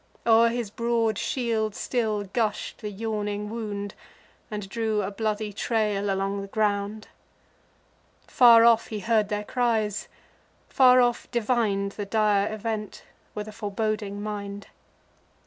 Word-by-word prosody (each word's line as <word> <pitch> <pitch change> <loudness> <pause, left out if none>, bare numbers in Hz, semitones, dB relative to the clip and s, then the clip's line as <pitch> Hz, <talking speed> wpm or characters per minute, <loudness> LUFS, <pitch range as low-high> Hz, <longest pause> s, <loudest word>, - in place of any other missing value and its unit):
O'er 230 0 +6
his 235 -3 -3
broad 230 -2 0
shield 225 -4 -1
still 220 -4 -1
gush'd 210 +2 -2
the 210 - -4
yawning 210 0 -3
wound, 205 -3 -4 0.6
And 210 -2 -5
drew 220 0 -1
a 195 - -3
bloody 215 0 -2
trail 210 -2 0
along 195 +1 -1
the 195 - -7
ground. 210 +1 -1 1.2
Far 235 -2 +7
off 230 -1 +5
he 215 -2 -5
heard 220 -2 +2
their 210 0 -2
cries, 220 -3 0 0.6
far 255 -2 +6
off 240 -1 0
divin'd 215 -4 0
The 205 0 -6
dire 210 -1 +2
event, 215 -1 -4 0.3
with 210 0 -4
a - - -7
foreboding 210 -1 -3
mind. 205 -1 -5
215 Hz, 130 wpm, -26 LUFS, 205-230 Hz, 1.2 s, Far